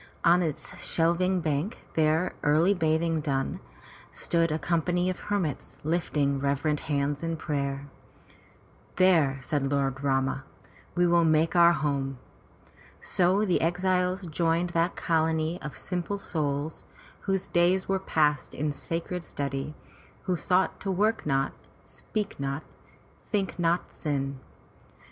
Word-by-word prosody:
On 175 +1 +5
its 160 -4 -3
shelving 175 +2 +1
bank, 155 +6 -1 0.2
their 160 +3 +2
early 155 +6 +4
bathing 160 -1 +1
done, 135 -2 -1 0.5
stood 165 -1 0
a 155 - +1
company 175 +3 +1
of 185 - -7
hermits 190 -9 -3
lifting 150 -3 0
reverent 140 +2 0
hands 145 -1 -1
in 165 -1 -2
prayer. 140 -2 -2 1.1
"There,'' 165 -7 +4
said 140 -2 -1
Lord 135 -1 0
Rama, 135 -1 +1 0.5
"will 175 -1 +4
we 160 - +3
make 160 +2 +2
our 170 0 +7
home.*' 140 -4 -1 0.8
So 185 +4 +2
the 180 - +2
exiles 180 +2 +1
joined 170 +1 0
that 170 +1 +1
colony 160 0 0
of 150 - -7
simple 180 +2 -3
souls, 150 -6 -2 0.4
whose 195 -1 -1
days 180 +2 +2
were 195 0 +1
passed 150 -6 +1
in 150 +1 -1
sacred 165 +4 -4
study, 140 -1 -4 0.5
who 185 - 0
sought 180 +3 +1
to 195 - -4
work 210 +1 +1
not, 135 -1 +1 0.3
speak 210 -6 -5
not, 140 +2 -2 0.7
think 195 -4 -1
not 170 +1 +1
sin. 140 -3 -2
165 Hz, 125 wpm, -28 LUFS, 145-180 Hz, 1.1 s, our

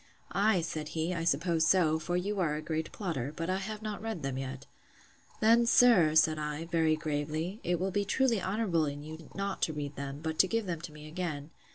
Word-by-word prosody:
Ay, 200 -2 +3
said 155 -2 -4
he, 165 +3 0
I 165 -2 -2
suppose 165 +1 +2
so; 160 -4 +4
for 175 +2 -1
you 200 +3 -2
are 160 -5 +1
a 150 - -3
great 160 -1 -3
plotter: 155 - -3
but 165 +2 -2
I 185 - +1
have 210 +2 -5
not 215 -1 -4
read 220 -8 -4
them 135 -1 -2
yet. 130 +1 -5 0.8
Then, 230 +2 +5
sir, 200 -12 +6
said 155 0 +4
I, 150 +1 -3
very 165 -2 +2
gravely, 155 +5 -3
it 175 -1 0
will 190 +1 -1
be 205 +2 +1
truly 230 +1 +1
honourable 190 -6 0
in 145 0 -5
you 160 +1 -9
not 195 0 -3
to 160 - +1
read 145 -1 -5
them; 140 0 -5
but 160 -1 -3
to 190 - +6
give 230 +1 -1
them 170 -4 -3
to 170 - -7
me 150 0 -11
again. 155 -2 -4
165 Hz, 220 wpm, -31 LUFS, 155-195 Hz, 0.8 s, sir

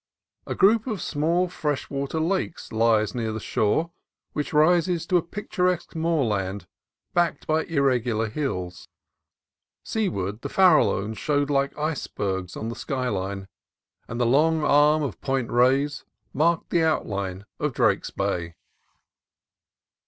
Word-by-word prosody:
A - - -3
group 215 +4 +4
of 215 -6 -2
small 165 +5 0
fresh 150 -5 -3
water 140 +3 -2
lakes 175 +1 -2
lies 110 -1 +2
near 115 -3 -2
the 110 - -4
shore, 110 +11 0 0.4
which 150 +4 -3
rises 170 +2 +3
to 180 - +3
a - - +2
picturesque 180 -1 -2
moorland 110 - -1 0.5
backed 175 -1 +1
by 155 +1 +1
irregular 125 -7 +1
hills. 90 -9 -4 1.0
Seaward, 110 - -2
the - - -5
Farallones 155 - +3
showed 145 -1 0
like 140 0 0
icebergs 100 - -3
on 110 - -4
the 115 - -5
sky 130 -2 -2
line, 95 -1 -3 0.6
and 120 - -5
the 120 - +2
long 155 +6 +3
arm 150 +1 +4
of 115 - -5
Point 135 -3 -1
Reyes 135 +4 +2 0.3
marked 165 +3 +1
the 170 - +3
outline 100 - -1
of - - 0
Drake's - - +1
Bay. 85 -1 -3
140 Hz, 130 wpm, -25 LUFS, 110-165 Hz, 1.0 s, group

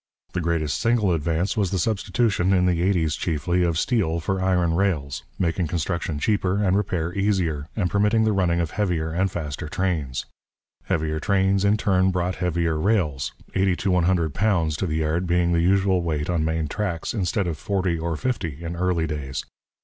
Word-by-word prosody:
The 90 - -1
greatest 80 -3 0
single 115 -5 +2
advance 85 +3 0
was 100 -4 +1
the 95 - -1
substitution, 95 0 +1
in 90 -1 +3
the 90 -2 +1
eighties 85 -4 +1
chiefly, 85 +2 0
of 85 -2 +1
steel 85 -7 +1
for 95 +4 -2
iron 90 -3 +2
rails, 80 -7 -1
making 85 -1 0
construction 85 -1 -2
cheaper 95 +2 +1
and 100 -2 +2
repair 90 -4 -1
easier, 90 -7 0
and 100 -5 +1
permitting 105 +4 +2
the 110 - +2
running 90 -3 +1
of 85 -3 -1
heavier 85 -6 -1
and 95 +4 +1
faster 75 -3 -5
trains. 80 -8 -2 0.6
Heavier 80 -1 -1
trains 95 +1 +2
in 100 +1 +3
turn 95 -3 +2
brought 90 0 -1
heavier 85 -3 0
rails, 80 -9 0 0.2
eighty 95 -1 +2
to 95 +2 -1
one 90 -2 +3
hundred 85 -5 +1
pounds 85 -7 +1
to 95 - -1
the 80 -1 -1
yard 85 +4 0
being 85 0 +2
the 85 -1 +2
usual 95 +1 +3
weight 80 -1 -1
on 85 -3 0
main 80 0 -1
tracks, 85 0 -3
instead 100 -2 0
of 80 -3 -3
forty 95 -5 -1
or 80 -1 -2
fifty 85 - -3
in 85 +1 -4
early 90 -2 0
days. 75 -4 -4
90 Hz, 185 wpm, -24 LUFS, 80-95 Hz, 0.6 s, in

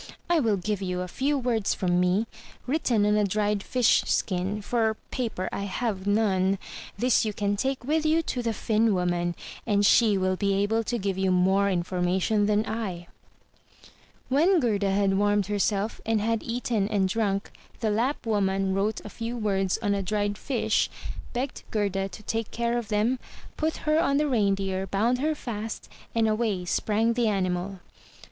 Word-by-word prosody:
I 340 - +4
will 220 -7 +2
give 205 +1 -2
you 180 -1 -2
a 180 - -3
few 280 +10 0
words 240 -5 0
from 175 -1 +1
me, 180 +5 +2 0.4
written 250 -6 +1
on 210 0 +3
a 210 - +3
dried 205 +1 0
fish 250 +2 +3
skin, 190 +2 0
for 220 -1 0
paper 225 -7 -2
I 200 - -3
have 200 -2 -3
none. 195 -2 +2 0.4
This 245 +3 +3
you 215 -2 -2
can 205 0 0
take 265 +3 -2
with 305 +4 +1
you 315 +1 +2
to 250 - -2
the 230 -1 0
Finn 220 0 +1
woman, 175 -1 0 0.3
and 205 -2 +3
she 215 -1 +5
will 185 0 +1
be 200 0 0
able 210 +3 +1
to 240 - -1
give 195 -3 -2
you 190 0 +2
more 190 +2 +3
information 185 +3 +1
than 210 +1 +2
L" 200 -6 -4 1.2
When 330 +8 +4
Gerda 210 -7 +1
had 195 0 +2
warmed 205 -1 +2
herself, 205 +1 -1
and 225 -1 +1
had 225 +1 0
eaten 230 -3 -1
and 200 -3 +2
drunk, 200 -1 -1 0.3
the 220 -2 0
Lapp 240 +7 0
woman 195 -3 +1
wrote 200 +3 0
a - - -6
few 230 +3 -5
words 195 -4 0
on 205 -1 +2
a 200 - 0
dried 205 +1 -1
fish, 250 +4 0 0.4
begged 255 +2 -3
Gerda 195 -2 -1
to 215 - -11
take 225 0 -2
care 235 0 -1
of 235 - -7
them, 220 +5 +1 0.4
put 315 0 -1
her 305 +1 +3
on 280 0 +2
the 300 +1 +2
Reindeer, 195 -5 0
bound 225 +7 +1
her 310 +3 0
fast, 225 -5 -6 0.3
and 225 -1 +3
away 215 -4 0
sprang 220 +5 +1
the 240 -1 +1
animal. 185 -1 -1
210 Hz, 175 wpm, -26 LUFS, 195-230 Hz, 1.2 s, she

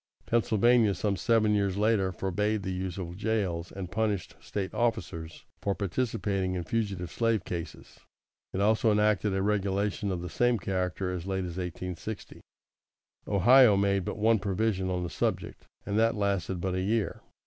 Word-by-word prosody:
Pennsylvania, 115 -1 +3
some 100 +3 0
seven 110 -1 +2
years 100 -2 +1
later, 105 -3 +2
forbade 100 +3 -1
the 95 - -3
use 90 -1 -4
of 90 -2 -5
jails, 95 -6 -1
and 95 -2 -6
punished 105 -4 -1
State 95 -2 -4
officers 85 -9 -2 0.2
for 100 -1 0
participating 100 -2 -1
in 90 - -2
fugitive 95 -2 -2
slave 115 -5 0
cases. 85 -2 -7 0.5
It 95 - -2
also 110 +2 +3
enacted 105 -1 +2
a 95 - 0
regulation 100 0 0
of 90 -2 -3
the - - -4
same 120 +7 +2
character 90 -2 -2
as 90 0 -5
late 95 -1 -1
as 85 0 -6
1860. 90 +3 -6 0.9
Ohio 110 +2 +6
made 100 -1 +2
but - - -4
one 110 +1 +3
provision 95 -1 0
on 90 -1 -1
the 85 - -3
subject, - - -3 0.2
and 105 +2 0
that 115 +1 +3
lasted 100 -3 -1
but 95 +1 -2
a 95 - -1
year. 110 +3 -1
100 Hz, 160 wpm, -29 LUFS, 90-110 Hz, 0.9 s, Ohio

